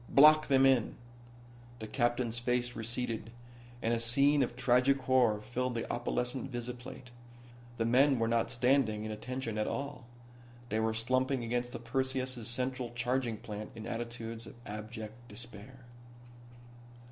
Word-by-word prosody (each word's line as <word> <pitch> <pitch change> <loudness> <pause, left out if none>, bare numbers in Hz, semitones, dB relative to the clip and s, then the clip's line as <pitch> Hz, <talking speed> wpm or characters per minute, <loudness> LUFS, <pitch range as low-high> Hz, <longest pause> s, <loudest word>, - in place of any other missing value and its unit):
Block 155 +2 +7
them 135 -1 +5
in." 130 -4 +3 0.8
The 110 - -6
captain's 120 -1 0
face 125 0 0
receded, 115 -1 -3 0.5
and 115 - +2
a 115 - +1
scene 140 +5 +4
of 120 -2 0
tragic 125 +2 +4
horror 125 -5 +3
filled 125 +2 -2
the 115 - -2
opalescent 125 +2 -2
visiplate. 125 +1 -7 0.7
The 115 - +1
men 135 +4 +5
were 115 -1 +1
not 115 0 +1
standing 120 -3 +2
at 110 - -4
attention 115 0 -4
at 105 - 0
all. 140 -3 -4 0.6
They 110 - 0
were 110 0 +1
slumping 130 +3 +1
against 120 +1 -1
the 120 - -5
Perseus' 130 -1 -2
central 125 0 -2
charging 120 -1 0
plant 105 0 -7
in 110 -1 -7
attitudes 115 -1 -5
of - - -11
abject 110 +2 -7
despair. 120 +2 -9
120 Hz, 140 wpm, -32 LUFS, 115-130 Hz, 0.8 s, Block